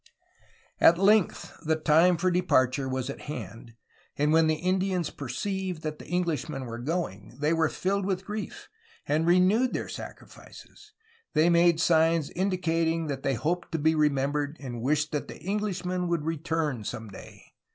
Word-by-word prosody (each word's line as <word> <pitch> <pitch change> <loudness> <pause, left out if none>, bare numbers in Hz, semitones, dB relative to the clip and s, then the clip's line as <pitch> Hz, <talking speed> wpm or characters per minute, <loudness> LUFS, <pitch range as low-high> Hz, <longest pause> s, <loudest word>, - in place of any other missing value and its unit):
At 170 - +6
length, 200 +1 +2
the 160 0 +1
time 165 +3 +4
for 185 +2 +1
departure 135 -7 +2
was 130 -1 -2
at - - -10
hand, 115 -2 -8 0.4
and 150 +2 +2
when 160 0 +5
the 155 - +2
Indians 185 0 0
perceived 180 +6 -4
that 155 -1 -4
the - - -12
Englishmen 160 -6 -2
were 115 0 -6
going 130 - -4
they 150 +2 +2
were 160 -1 +2
filled 195 +1 -1
with 190 -1 -2
grief, 210 +1 -6 0.4
and 155 +3 +1
renewed 185 +8 +4
their - - -3
sacrifices. - - -11 0.4
They 160 +3 +4
made 170 -1 +4
signs 165 -2 +3
indicating 165 -3 0
that 135 -1 -3
they 135 -1 0
hoped 170 +10 -2
to - - +1
be 160 +1 +2
remembered 145 0 0
and 120 -4 -6
wished 150 +4 0
that 150 - -3
the - - -10
Englishmen 185 -3 -2
would 170 -3 -1
return 160 -6 -2
some 110 +2 -6
day. 95 - -12
160 Hz, 160 wpm, -27 LUFS, 145-180 Hz, 0.4 s, At